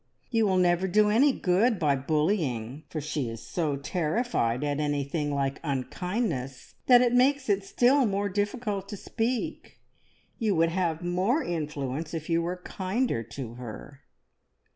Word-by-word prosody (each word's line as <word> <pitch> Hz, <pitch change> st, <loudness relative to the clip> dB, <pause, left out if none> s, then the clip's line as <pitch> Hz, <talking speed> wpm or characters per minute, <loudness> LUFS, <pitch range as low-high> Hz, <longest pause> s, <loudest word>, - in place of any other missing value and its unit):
You 225 Hz, -3 st, +3 dB
will 190 Hz, -1 st, +2 dB
never 180 Hz, +1 st, +3 dB
do 210 Hz, +3 st, +4 dB
any 270 Hz, +7 st, +5 dB
good 210 Hz, +2 st, +2 dB
by 150 Hz, -5 st, +2 dB
bullying, 145 Hz, -, -1 dB
for 155 Hz, -, -4 dB
she 145 Hz, -4 st, -2 dB
is 115 Hz, 0 st, -7 dB
so 155 Hz, 0 st, -2 dB
terrified 150 Hz, -, -1 dB
at 145 Hz, 0 st, -1 dB
anything 145 Hz, 0 st, -1 dB
like 140 Hz, -1 st, -1 dB
unkindness 140 Hz, -, -3 dB
that 245 Hz, -1 st, +8 dB
it 245 Hz, -1 st, +2 dB
makes 265 Hz, +1 st, +3 dB
it 200 Hz, -1 st, +2 dB
still 250 Hz, +6 st, +3 dB
more 200 Hz, 0 st, 0 dB
difficult 205 Hz, 0 st, -2 dB
to 205 Hz, -, -5 dB
speak. 235 Hz, +4 st, -3 dB, 0.6 s
You 215 Hz, -5 st, +1 dB
would 165 Hz, 0 st, +3 dB
have 170 Hz, -2 st, -1 dB
more 190 Hz, -, +1 dB
influence 150 Hz, -, -3 dB
if 160 Hz, +1 st, -5 dB
you 165 Hz, 0 st, +3 dB
were 175 Hz, +2 st, -3 dB
kinder 195 Hz, -, -1 dB
to 115 Hz, +1 st, -7 dB
her." 125 Hz, +4 st, -9 dB
175 Hz, 150 wpm, -27 LUFS, 145-210 Hz, 0.6 s, that